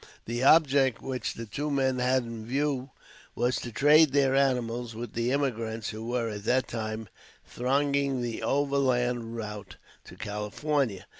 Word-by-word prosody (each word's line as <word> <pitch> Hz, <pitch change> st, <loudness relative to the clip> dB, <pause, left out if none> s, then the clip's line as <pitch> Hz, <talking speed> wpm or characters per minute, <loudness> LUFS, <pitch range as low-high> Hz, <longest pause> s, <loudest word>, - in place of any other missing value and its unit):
The 120 Hz, +2 st, -3 dB
object 135 Hz, -4 st, +4 dB
which 130 Hz, -3 st, -3 dB
the 115 Hz, -, -6 dB
two 145 Hz, +8 st, -4 dB
men 130 Hz, -2 st, +1 dB
had 130 Hz, +1 st, +2 dB
in 115 Hz, -1 st, -7 dB
view 135 Hz, +2 st, -1 dB, 0.5 s
was 120 Hz, +2 st, +1 dB
to 120 Hz, -, -5 dB
trade 150 Hz, +4 st, +5 dB
their 135 Hz, -2 st, +3 dB
animals 125 Hz, -4 st, 0 dB
with 115 Hz, -1 st, -6 dB
the 120 Hz, +2 st, 0 dB
emigrants 115 Hz, -5 st, -1 dB
who 110 Hz, 0 st, -6 dB
were, 120 Hz, -1 st, -1 dB
at 105 Hz, -2 st, -5 dB
that 130 Hz, +2 st, +2 dB
time, 110 Hz, -1 st, -4 dB, 0.4 s
thronging 140 Hz, 0 st, 0 dB
the 120 Hz, -2 st, -4 dB
overland 125 Hz, -4 st, 0 dB
route 105 Hz, -3 st, -6 dB, 0.3 s
to -, -, -12 dB
California. 105 Hz, +1 st, -2 dB
125 Hz, 150 wpm, -28 LUFS, 115-140 Hz, 0.5 s, trade